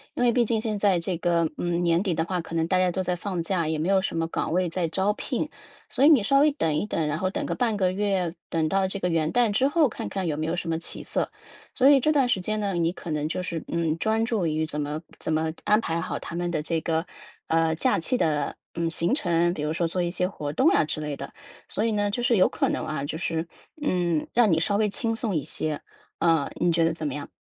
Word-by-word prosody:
因 245 - 0
为 240 - +5
毕 240 0 +3
竟 225 0 +1
现 215 -2 -2
在 195 -4 +3
这 180 +2 -2
个， 170 -1 +2
嗯， 175 0 0
年 170 0 +3
底 190 -4 0
的 160 - 0
话， 180 0 -2
可 165 0 -8
能 165 0 +1
大 185 0 +2
家 185 0 +3
都 185 +2 -2
在 180 0 0
放 180 -2 -3
假， 170 -3 0
也 160 - -1
没 155 +4 -1
有 195 -1 +4
什 185 - -3
么 165 - 0
岗 165 - -2
位 180 +1 +2
在 170 0 -1
招 190 +5 +1
聘。 - - -2 0.4
所 265 - 0
以 - - +8
你 275 -10 +6
稍 275 +6 +4
微 300 +1 +5
等 165 - 0
一 205 +8 -1
等， 160 -6 -1
然 150 +1 -1
后 185 0 0
等 - - -3
个 - - -2
半 230 -4 0
个 185 -2 +2
月， 190 -3 0 0.2
等 160 -1 +1
到 195 +2 +1
这 195 - -4
个 180 - 0
元 160 -1 +1
旦 240 -3 +3
之 255 +7 +3
后 300 0 +3
看 - - -5
看 195 -2 -3
有 155 -3 0
没 155 +1 -2
有 165 - 0
什 175 -1 -4
么 160 0 0
起 - - -6
色。 - - -2 0.4
所 265 0 +5
以 275 - +6
这 305 +4 +2
段 275 -4 +3
时 245 -6 +1
间 215 +3 -1
呢， 200 -2 -1
你 170 -1 +1
可 170 - -7
能 150 0 -1
就 180 +2 -2
是， 170 -3 -4
嗯， 165 -2 0
专 220 +1 +1
注 220 -7 0
于 155 0 0
怎 150 -1 -4
么 150 +2 -3 0.2
怎 - - -3
么 160 0 0
安 210 +1 +4
排 165 -6 -2
好 - - -3
他 170 - -7
们 175 0 -1
的 155 -3 -2
这 160 0 -1
个， 165 +1 -1 0.4
呃， 160 0 +2
假 160 - +2
期 250 +9 0
的， 150 -6 0 0.2
嗯 170 -1 -1
行 170 +6 0
程。 175 - +2
比 150 - -5
如 150 - -1
说 165 +1 0
做 180 +2 -2
一 175 - 0
些 180 +1 0
活 150 -6 -5
动 260 - +2
啊 - - +4
之 155 0 -3
类 150 -1 -3
的， 140 - -7 0.4
所 215 - -1
以 230 - +1
呢 205 -1 +1
就 240 +4 -2
是 240 -3 +3
有 185 - +5
可 - - 0
能 - - -2
啊 145 -2 -3
就 160 - -4
是， 165 -1 -2 0.3
嗯， 175 - 0
让 230 -4 +4
你 160 - +3
稍 200 +5 +1
微 210 0 +2
轻 225 +3 -1
松 225 -4 -2
一 150 - 0
些， 155 -2 -2 0.4
呃， 165 -4 +2
你 175 - +3
觉 165 0 +2
得 165 - +3
怎 160 -1 -5
么 140 - -3
样？ 145 0 -6
175 Hz, 300 characters per minute, -26 LUFS, 160-205 Hz, 0.4 s, 以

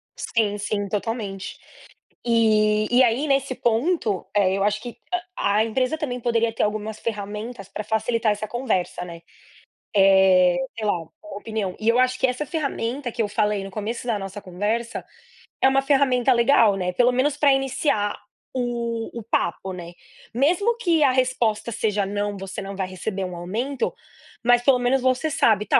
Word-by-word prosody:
Sim, 210 -3 0
sim, 205 0 -2
totalmente. 205 -2 -4 0.7
E 215 -2 +3
e 245 +2 +6
aí 250 +4 +2
nesse 275 -2 +1
ponto, 235 - 0
eh, 195 -2 +3
eu 195 - 0
acho 210 +1 +1
que 240 -1 -8 0.2
a 360 0 -2 0.3
a 215 - +4
empresa 255 +6 0
também 265 -6 -4
poderia 230 -1 +1
ter - - -2
algumas 215 +1 -2
ferramentas 210 0 -5
pra 200 - -5
facilitar 220 +1 0
essa 210 +1 -4
conversa, 215 -8 -2
né, 170 -1 -10 0.7
eh, 190 -2 +6 0.2
sei 220 - -3
lá, 205 - +3
uma 165 - -14 0.3
opinião. 205 -3 -3
E 220 - +1
eu 230 - +4
acho 255 0 +2
que 260 - +3
essa 250 +4 -2
ferramenta 275 -4 -3
que 235 - -2
eu - - -1
falei 210 -1 0
no 195 - -8
começo 220 +4 -4
da 225 -4 0
nossa 195 +1 -6
conversa, 205 +5 -3 0.6
é - - +6
uma 270 0 +3
ferramenta 270 -2 +3
legal, 235 -3 +4
né, 180 -1 -2
pelo 245 +6 +4
menos 275 +3 +1
pra 285 -2 +5
iniciar 270 -6 0 0.4
o 235 -2 -2
o 225 - -9
papo, 190 -3 -1
né. 175 -1 -8 0.4
Mesmo 360 - +2
que 340 -9 +2
a 270 - +5
resposta 250 -4 0
seja: 210 -2 0
"Não, 205 0 -2
você 195 +1 -6
não 195 0 -6
vai 190 -1 -2
receber 190 +1 -4
um 180 -1 -6
aumento", 235 +10 -2 0.5
mas 245 0 +5
pelo 265 0 +5
menos 250 +2 +2
você 260 +4 +1
sabe. 220 -10 +3
"Tá, - - +5
225 Hz, 175 wpm, -23 LUFS, 205-255 Hz, 0.7 s, e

